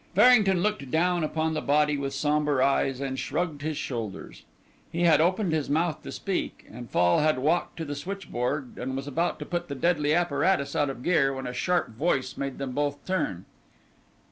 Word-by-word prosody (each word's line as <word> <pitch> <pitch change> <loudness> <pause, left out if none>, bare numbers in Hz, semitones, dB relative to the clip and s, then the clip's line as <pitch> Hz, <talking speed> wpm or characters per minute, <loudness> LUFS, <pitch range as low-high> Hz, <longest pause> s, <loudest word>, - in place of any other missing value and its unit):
Farrington 205 -5 +5
looked 210 -11 -1
down 175 +3 +1
upon 160 +1 -1
the 155 - -1
body 150 +1 +2
with 140 -1 -3
sombre 145 -1 +2
eyes 135 -1 +1
and 135 -1 -3
shrugged 155 -1 -2
his 155 0 -3
shoulders. 115 -7 -5 0.5
He 170 +1 -1
had 160 -3 +5
opened 185 +1 +1
his 155 -3 -1
mouth 160 +2 0
to - - -8
speak 195 -2 -3
and 120 +1 -9
Fall 85 0 +3
had 155 -2 +2
walked 155 +7 0
to 165 - -4
the 145 - -4
switchboard 145 -6 -4
and 130 +1 -3
was 135 +1 -4
about 165 +5 -1
to - - -7
put 175 0 -3
the 140 - -5
deadly 150 +1 +2
apparatus 175 -4 +1
out 145 -2 +2
of 130 -2 -7
gear, 150 -6 +3
when 130 0 -5
a 125 - -4
sharp 180 +6 0
voice 130 +1 -1
made 140 -1 -4
them 135 -2 -4
both 145 +2 -2
turn. 100 - -2
150 Hz, 195 wpm, -27 LUFS, 135-175 Hz, 0.5 s, Farrington